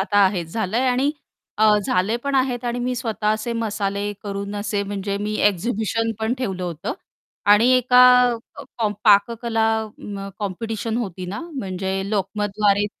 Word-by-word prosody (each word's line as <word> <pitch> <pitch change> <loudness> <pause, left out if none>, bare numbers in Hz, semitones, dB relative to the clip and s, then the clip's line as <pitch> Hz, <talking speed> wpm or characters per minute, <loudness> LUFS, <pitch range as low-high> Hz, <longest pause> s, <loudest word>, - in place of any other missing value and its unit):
आता 205 +1 +1
आहे 185 -3 +1
झालंय 220 +7 -1
आणि 260 +3 +2 0.5
अ, 220 - +4 0.2
झाले 195 +5 +1
पण 280 +3 -3
आहेत 255 -2 +1
आणि 240 0 -2
मी 250 +1 -1
स्वतः 225 -3 -3
असे 215 +2 0
मसाले 205 -2 -2
करून 200 0 -5
असे 205 0 -1
म्हणजे 200 0 -3
मी 210 +1 -3
एक्झिबिशन 220 +3 -1
पण 220 +2 0
ठेवलं 195 -8 -4
होतं 170 -3 -4 0.6
आणि 230 +5 +5
एका 250 0 +5 0.8
कॉम 215 -2 +1
पाककला 225 +2 +3 0.2
अ, 205 -2 -8
कॉम्पिटिशन 220 +3 -3
होती 190 -6 -4
ना 190 - -5
म्हणजे 190 -5 -3
लोकमतद्वारे 205 0 +1
210 Hz, 145 wpm, -22 LUFS, 200-230 Hz, 0.8 s, आणि